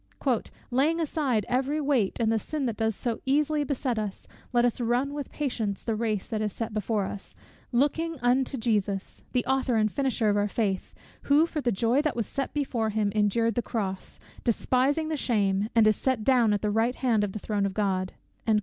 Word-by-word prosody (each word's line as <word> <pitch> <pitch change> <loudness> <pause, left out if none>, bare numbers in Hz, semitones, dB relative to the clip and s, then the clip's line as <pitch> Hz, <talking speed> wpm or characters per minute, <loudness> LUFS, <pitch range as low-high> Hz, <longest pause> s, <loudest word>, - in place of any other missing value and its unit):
"Laying 295 +7 +2
aside 275 -9 0
every 270 +4 0
weight, 275 -10 +1
and 225 -1 +2
the 225 - +2
sin 295 +6 -3
that 230 -3 -2
does 220 -1 0
so 235 +1 -3
easily 295 +2 +2
beset 260 -4 -1
us; 205 -2 -5 0.2
let 240 -1 +3
us 245 0 0
run 245 +4 +1
with 290 -1 -5
patience 225 -9 -2
the 225 - -1
race 215 -3 -1
that 215 -1 -3
is 210 -1 -1
set 225 +2 -4
before 215 -1 0
us, 195 +1 -7 0.4
LOOKING 305 +6 +1
UNTO 255 +2 +2
JESUS, 205 -4 -1
the 250 -2 0
Author 265 -2 +1
and 215 -1 +2
Finisher 265 -5 0
of 205 0 +3
our 205 0 +2
faith, 200 -3 -2 0.3
who 295 +3 +6
for 320 -2 -3
the 240 -2 +1
joy 230 +7 +2
that 305 -2 -1
was 230 -2 -1
set 275 +6 -3
before 250 -6 -1
him 210 -1 0
endured 220 +2 +2
the 240 - 0
cross, 195 -5 -4 0.3
despising 265 +6 +1
the 310 - -1
shame, 205 -5 +1
and 225 -2 +6
is 215 -1 +4
set 260 -5 0
down 240 -3 +4
at 205 0 0
the 210 - +1
right 225 +4 +1
hand 230 -5 +1
of 200 -2 -2
the - - -4
throne 205 -1 -1
of 190 - -6
God." 190 -3 0
230 Hz, 205 wpm, -27 LUFS, 210-270 Hz, 0.4 s, who